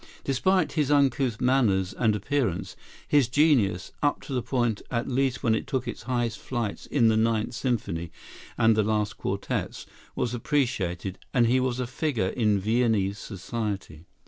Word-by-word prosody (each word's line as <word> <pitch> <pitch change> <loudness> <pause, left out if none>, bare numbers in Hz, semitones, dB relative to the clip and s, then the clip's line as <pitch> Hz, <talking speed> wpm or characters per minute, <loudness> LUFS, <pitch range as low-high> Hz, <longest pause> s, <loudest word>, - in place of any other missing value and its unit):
Despite 160 +4 +2
his 150 -4 0
uncouth 135 -5 +2
manners 115 -7 +2
and 110 -3 +1
appearance, 115 -3 -1 0.3
his 145 -5 +4
genius, 125 - +2
up 145 -1 +1
to 140 - -7
the 125 - 0
point 120 -3 0
at 120 -1 -2
least 130 0 0
when 115 - +3
it 110 - -2
took 130 -2 -2
its 120 - -5
highest 120 -2 -1
flights 120 -5 -4
in 120 -6 +3
the 110 - +3
"Ninth 110 0 +1
Symphony" 105 -10 -2 0.5
and 115 -1 +4
the 110 - +3
last 105 -1 0
quartets, - - -3 0.3
was 120 - -1
appreciated; 115 - -1 0.2
and 120 -2 +5
he 125 +3 +3
was 130 -1 -1
a 125 - -1
figure 125 -5 -1
in 105 -4 +1
Viennese 105 -2 +1
society. 100 -6 -5
120 Hz, 160 wpm, -26 LUFS, 105-130 Hz, 0.5 s, and